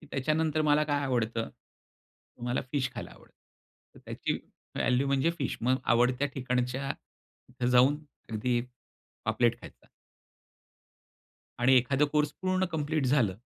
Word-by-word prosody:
की 155 Hz, -, -15 dB
त्याच्यानंतर 155 Hz, +3 st, +1 dB
मला 150 Hz, 0 st, +4 dB
काय 145 Hz, -1 st, 0 dB
आवडतं? 115 Hz, -3 st, -1 dB
तर -, -, -26 dB
मला 120 Hz, +1 st, 0 dB
फिश 135 Hz, -3 st, 0 dB
खायला -, -, -6 dB
आवडतं. -, -, -18 dB, 0.6 s
तर -, -, -15 dB
त्याची -, -, -2 dB, 0.4 s
व्हॅल्यू 130 Hz, +2 st, +2 dB
म्हणजे 140 Hz, +4 st, +2 dB
फिश. 140 Hz, -, -2 dB
मग 130 Hz, +3 st, +2 dB
आवडत्या 125 Hz, +3 st, +3 dB
ठिकाणच्या 125 Hz, +1 st, -1 dB, 0.6 s
इथं 125 Hz, 0 st, -3 dB
जाऊन 130 Hz, +4 st, +5 dB, 0.3 s
अगदी 120 Hz, +2 st, 0 dB, 0.6 s
पापलेट 120 Hz, +2 st, +1 dB
खायचा. -, -, -14 dB, 1.8 s
आणि 130 Hz, +1 st, +6 dB
एखादं 135 Hz, +3 st, +3 dB
कोर्स 150 Hz, -1 st, +2 dB
पूर्ण 185 Hz, 0 st, +1 dB
कम्प्लीट 150 Hz, -2 st, 0 dB
झालं 125 Hz, -8 st, +3 dB
130 Hz, 130 wpm, -29 LUFS, 125-145 Hz, 1.8 s, आणि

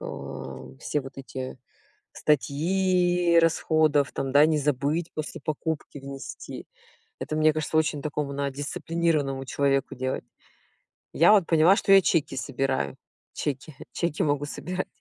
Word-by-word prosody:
э, 65 Hz, -1 st, -8 dB
все 150 Hz, -, -2 dB
вот 135 Hz, 0 st, -10 dB
эти 130 Hz, -1 st, -7 dB, 0.5 s
статьи 175 Hz, +4 st, +2 dB
расходов, 155 Hz, -3 st, +2 dB
там, 135 Hz, -1 st, -3 dB
да, 145 Hz, +2 st, +7 dB
не 155 Hz, -1 st, +2 dB
забыть 150 Hz, +4 st, -1 dB
после 155 Hz, -1 st, -5 dB
покупки 155 Hz, -1 st, -4 dB
внести. 135 Hz, 0 st, -8 dB, 0.5 s
Это 155 Hz, -, -3 dB
мне 155 Hz, 0 st, +4 dB
кажется 155 Hz, +1 st, -2 dB
очень 160 Hz, -2 st, +1 dB
такому 150 Hz, -2 st, -3 dB
надо 140 Hz, -1 st, -3 dB
дисциплинированному 145 Hz, -2 st, -1 dB
человеку 135 Hz, -1 st, 0 dB
делать. 130 Hz, +1 st, -3 dB, 0.9 s
Я 175 Hz, +6 st, +6 dB
вот 195 Hz, -5 st, +5 dB
поняла, 165 Hz, +4 st, +5 dB
что 195 Hz, -, +2 dB
я 195 Hz, -, +9 dB
чеки 150 Hz, -5 st, +1 dB
собираю. 135 Hz, -, -2 dB, 0.4 s
Чеки 140 Hz, +1 st, -4 dB, 0.2 s
чеки 170 Hz, -3 st, -1 dB
могу 145 Hz, -1 st, 0 dB
собирать. 180 Hz, +5 st, -4 dB
150 Hz, 130 wpm, -26 LUFS, 135-165 Hz, 0.9 s, я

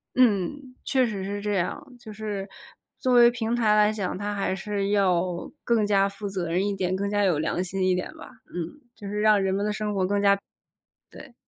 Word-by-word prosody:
嗯， 255 Hz, +3 st, +1 dB
确 260 Hz, -1 st, +2 dB
实 205 Hz, -5 st, -4 dB
是 205 Hz, +1 st, -4 dB
这 210 Hz, 0 st, -1 dB
样。 195 Hz, +9 st, -1 dB, 0.2 s
就 220 Hz, -2 st, -10 dB
是 205 Hz, -2 st, -4 dB, 0.5 s
作 255 Hz, -, +1 dB
为 240 Hz, -1 st, +8 dB
平 240 Hz, -1 st, -2 dB
台 220 Hz, -3 st, +3 dB
来 210 Hz, 0 st, +4 dB
讲， 200 Hz, -4 st, -3 dB
它 205 Hz, +1 st, -3 dB
还 195 Hz, -2 st, -1 dB
是 200 Hz, +1 st, -2 dB
要 180 Hz, -3 st, +1 dB
更 225 Hz, -3 st, +2 dB
加 195 Hz, -1 st, +3 dB
负 200 Hz, +1 st, -7 dB
责 185 Hz, -4 st, -3 dB
任 185 Hz, +3 st, +1 dB
一 200 Hz, -, -1 dB
点、 185 Hz, -1 st, -1 dB
更 200 Hz, +1 st, -2 dB
加 205 Hz, 0 st, +1 dB
有 180 Hz, -6 st, +2 dB
良 170 Hz, +3 st, -1 dB
心 185 Hz, +1 st, -3 dB
一 185 Hz, -, +3 dB
点 180 Hz, -, -3 dB
吧， -, -, -11 dB, 0.2 s
嗯， 175 Hz, -, -6 dB
就 205 Hz, -, -9 dB
是 210 Hz, +1 st, -2 dB
让 215 Hz, -2 st, +5 dB
人 190 Hz, 0 st, 0 dB
们 200 Hz, +1 st, 0 dB
的 210 Hz, -, 0 dB
生 210 Hz, 0 st, -2 dB
活 190 Hz, -2 st, +1 dB
更 200 Hz, +1 st, 0 dB
加 200 Hz, -1 st, +4 dB, 0.7 s
对。 250 Hz, -, -13 dB
200 Hz, 235 characters per minute, -25 LUFS, 190-215 Hz, 0.7 s, 为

